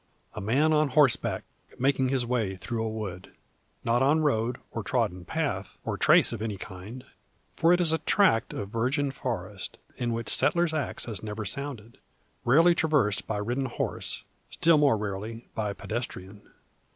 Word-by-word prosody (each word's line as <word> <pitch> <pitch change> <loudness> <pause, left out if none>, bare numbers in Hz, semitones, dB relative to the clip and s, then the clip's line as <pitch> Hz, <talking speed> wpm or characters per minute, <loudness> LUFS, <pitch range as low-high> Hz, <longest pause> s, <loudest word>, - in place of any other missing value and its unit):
A 105 - -6
man 140 +10 +2
on 155 0 +3
horseback 140 -2 +3 0.3
making 130 0 +2
his 130 -2 +1
way 115 -6 -1
through 110 +4 -4
a 110 - -1
wood. 105 -5 -6 0.5
Not 120 +2 +2
on 145 +4 +4
road, 120 -5 +1
or - - -3
trodden 90 0 -1
path, 140 -12 -3
or - - -1
trace - - +5
of 115 - -5
any 110 -3 -3
kind. 100 +8 -9 0.5
For 165 - +3
it 175 - +4
is 170 -3 +3
a 160 - +1
tract 160 - +3
of 100 - -5
virgin 130 +6 0
forest, 105 -8 -5 0.2
in 120 -1 -1
which 115 -1 -2
settler's 170 -2 +2
axe 155 -3 -1
has 110 -6 -4
never 110 0 -5
sounded, 120 0 -5 0.5
rarely 165 +8 +6
traversed 145 -11 +1
by 110 - -2
ridden 120 +6 -1
horse; 130 - -2 0.3
still 165 -2 +4
more 140 -6 +4
rarely 105 +3 -5
by 105 -2 -2
pedestrian. 105 -2 -6
120 Hz, 165 wpm, -27 LUFS, 105-145 Hz, 0.5 s, rarely